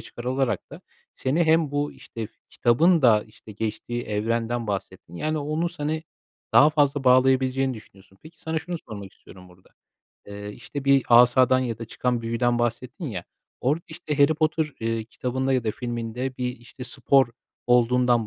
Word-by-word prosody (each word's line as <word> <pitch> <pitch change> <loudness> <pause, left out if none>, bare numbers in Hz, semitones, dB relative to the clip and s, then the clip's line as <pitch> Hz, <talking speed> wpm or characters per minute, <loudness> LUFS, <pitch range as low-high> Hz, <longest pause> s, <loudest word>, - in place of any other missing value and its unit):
çıkarılarak 130 +1 -3
da - - -10 0.3
seni 155 +6 +1
hem 160 -2 +3
bu, 145 0 -1
işte, 115 -1 -7
fi - - -28
kitabın 160 +8 +3
da, 110 -4 +5
işte, 110 0 -14
geçtiği 110 +3 -4
evrenden 115 +2 -1
bahsettin, 95 -4 -5
yani, 155 - -1
onun 155 +3 -1
seni 155 -2 -3 0.5
daha 150 - +7
fazla 145 -2 +1
bağlayabileceğini 130 0 +3
düşünüyorsun. 95 -3 -16
Peki, 160 +1 -15
sana 160 0 -2
şunu 175 +2 -5
sormak 100 -3 -8
istiyorum 90 -1 -16
burada: 90 +1 -21 0.6
Eee, 100 0 -7
işte, 140 +6 -7
bir 140 -1 +5
asadan 125 +2 +6
ya 120 -4 -2
da 115 - -5
çıkan 120 +1 -2
büyüden 120 +1 0
bahsettin 120 +6 -3
ya, 95 - -5 0.4
orada, 150 +6 0
işte, 155 -2 -5
Harry 145 +2 +5
Potter, 155 -1 0
eee, 115 -1 -1
kitabında 130 +3 -2
ya 130 -3 +1
da 110 - +1
filminde 120 +2 -4
bir, 125 0 -3
işte, 120 +2 -11
spor 135 +2 +3 0.4
olduğundan 120 -1 +3
125 Hz, 160 wpm, -25 LUFS, 115-145 Hz, 0.6 s, daha